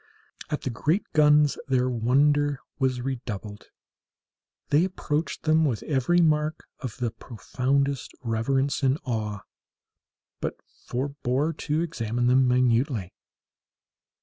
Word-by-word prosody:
At 150 - -2
the 130 - -3
great 155 - 0
guns 150 -1 +4
their 130 -2 +2
wonder 140 +4 +2 0.2
was 130 -2 +1
redoubled. 110 -5 -5 1.0
They 150 +4 +4
approached 165 -4 -2
them 160 0 +3
with 130 -8 0
every 150 +4 +2
mark 155 -1 +1 0.2
of 125 -5 -6
the 120 -2 -1
profoundest 135 +5 -2
reverence 135 +5 0
and 135 0 +2
awe, 110 -5 -3 1.0
but - - -3 0.3
forbore 140 +3 -1
to 155 +1 -1
examine 120 -8 -2
them 130 +1 +4
minutely. 125 -5 +1
135 Hz, 110 wpm, -26 LUFS, 120-150 Hz, 1.0 s, guns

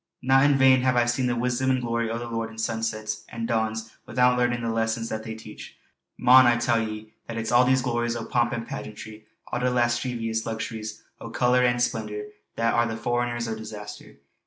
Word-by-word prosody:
Not 135 +2 +5
in 145 -1 +4
vain 130 -1 +6
hae 130 -1 +3
I 120 - +3
seen 120 +2 0
the 120 - 0
wisdom 125 +2 0
and 130 -1 +2
glory 115 -1 -1
o' 115 - -2
the 120 - -5
Lord 115 -1 -3
in 110 - -13
sunsets 110 -1 -3
an' 115 0 -4
dawns 110 -1 -1 0.2
wi'oot 125 +1 +3
learnin' 120 -1 0
the 115 - -1
lessons 115 0 -1
that 110 - -3
they 110 0 -6
teach. 110 - -11 0.4
Mon, 130 +1 +7
I 120 0 +4
tell 120 -1 +1
ye 110 0 -6
that 115 - -5
it's 115 0 -2
all 120 +1 +6
those 130 0 +3
glories 120 -1 -1
o' 115 -1 -4
pomp 120 -1 +1
and 115 0 -4
pageantry 110 0 -8 0.2
all - - -1
the 125 - +1
lasceevious 120 -2 0
luxuries 110 -1 -5 0.2
o' 115 - -8
colour 125 +2 +2
an' 120 0 +2
splendour, 110 -3 -2 0.3
that 115 0 +1
are 120 0 +3
the 115 -1 -4
forerinners 120 0 -1
o' 115 - -2
disaster. 105 -1 -9
115 Hz, 210 wpm, -25 LUFS, 110-125 Hz, 0.4 s, Mon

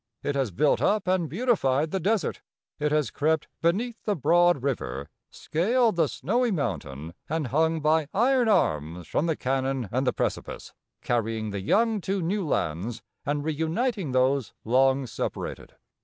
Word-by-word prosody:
It 145 - -1
has 135 -4 0
built 140 - +2
up 210 -2 +1
and 180 -4 +1
beautified 160 - +1
the 190 - 0
desert. 205 +3 0 0.4
It 150 0 0
has 150 -2 +1
crept 155 +1 0
beneath 220 +8 0
the 210 - 0
broad 175 -2 +3
river, 70 - -3 0.2
scaled 225 +7 +1
the 165 -3 +3
snowy 240 - 0
mountain, 85 - -3 0.2
and 160 -1 -1
hung 160 +3 +1
by 155 0 +2
iron 245 +2 +3
arms 85 - +1
from 165 - 0
the 160 - +1
canon 130 -4 -1
and 130 +2 0
the - - +4
precipice, - - -4 0.3
carrying 115 -2 -1
the 100 -1 -4
young 220 - +2
to 195 +2 -1
new 190 +4 -1
lands 105 - -2 0.2
and 145 0 0
reuniting 160 - -1
those 130 0 +1
long 130 +3 +3
separated. 115 - -5
150 Hz, 155 wpm, -26 LUFS, 130-190 Hz, 0.4 s, the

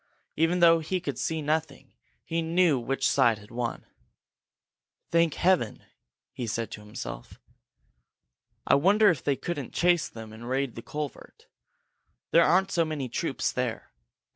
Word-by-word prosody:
Even 165 +3 +1
though 165 -1 +7
he 180 +4 -2
could 180 - -5
see 160 -2 -2
nothing, 155 -1 -2 0.3
he 165 0 -2
knew 165 -3 +2
which 135 +3 -1
side 120 -5 +3
had 105 +1 -16
won. 120 0 -4 1.3
"Thank 165 -2 +3
Heaven!" 175 - +1 0.5
he 120 - -5
said 115 +1 -3
to 105 - -8
himself. 105 0 -8 1.3
"I - - +3
wonder 200 +7 +5
if 155 - -4
they 140 - +1
couldn't 145 -4 -5
chase 175 -2 +2
them 110 -1 -10
and 115 +2 -9
raid 135 -1 -1
the 115 - -8
culvert. 150 +3 -7 0.9
There 170 - +6
aren't 190 +3 +3
so 170 - +2
many 150 -5 -4
troops - - -2
there! - - -3
150 Hz, 145 wpm, -27 LUFS, 120-170 Hz, 1.3 s, though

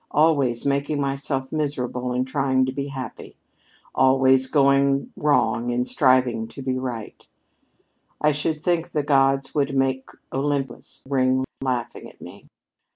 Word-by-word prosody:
Always 140 -6 +2
making 140 +1 0
myself 135 -1 -2
miserable 125 -5 -2
in 125 +1 0
trying 130 -1 +1
to 130 - -2
be 140 +1 -4
happy! 130 -5 -8 0.6
Always 130 0 +4
going 140 -1 +2
wrong 120 -5 +1
in 120 +1 0
striving 130 -4 +2
to 135 - -10
be 130 -1 -1
right! 120 -4 -6 1.0
I 150 - +3
should 150 +1 -2
think 170 -2 0
the 150 - 0
gods 135 -1 +2
would 140 -2 0
make 130 0 0 0.2
Olympus 135 -2 -3
ring 130 -1 +1 0.2
laughing 125 -3 -3
at - - -21
me! - - -12
135 Hz, 135 wpm, -23 LUFS, 130-140 Hz, 1.0 s, Always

